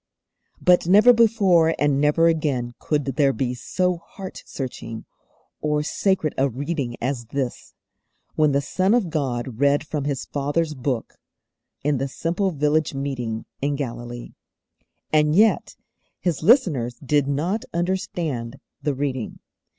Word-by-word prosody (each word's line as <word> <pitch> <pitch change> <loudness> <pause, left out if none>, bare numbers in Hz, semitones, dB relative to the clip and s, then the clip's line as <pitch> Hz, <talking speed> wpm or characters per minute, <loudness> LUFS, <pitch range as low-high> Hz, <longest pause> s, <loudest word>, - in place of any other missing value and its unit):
But 180 -2 +4
never 210 +7 +7
before 200 -8 +4
and 145 -1 +2
never 150 +3 +4
again 140 -7 0
could 145 -3 -1
there 135 +1 +2
be 125 0 -2
so 180 +8 -1
heart 185 +3 -10
searching 115 -4 -6 0.6
or 150 -1 0
sacred 180 -1 0
a 135 +1 +3
reading 135 -1 -3
as 125 -1 -2
this, 130 0 -4 0.6
when 155 -1 +3
the 140 0 +2
Son 190 +8 +2
of 200 -9 0
God 125 -6 -2
read 145 +1 +3
from 150 -2 -3
His 140 -2 -2
Father's 150 +3 -1
Book 130 -3 -3 0.7
in 145 -2 +1
the 135 - -1
simple 170 +8 -1
village 150 -2 0
meeting 125 -5 -3 0.2
in 140 +1 0
Galilee. 120 -3 -6 0.8
And 150 0 +4
yet 215 +3 +3 0.4
His 175 -5 -1
listeners 155 - +3
did 145 0 +2
not 165 +10 -1
understand 165 -8 -2 0.2
the 145 -2 -1
reading. 130 -4 -3
145 Hz, 135 wpm, -23 LUFS, 130-170 Hz, 0.8 s, never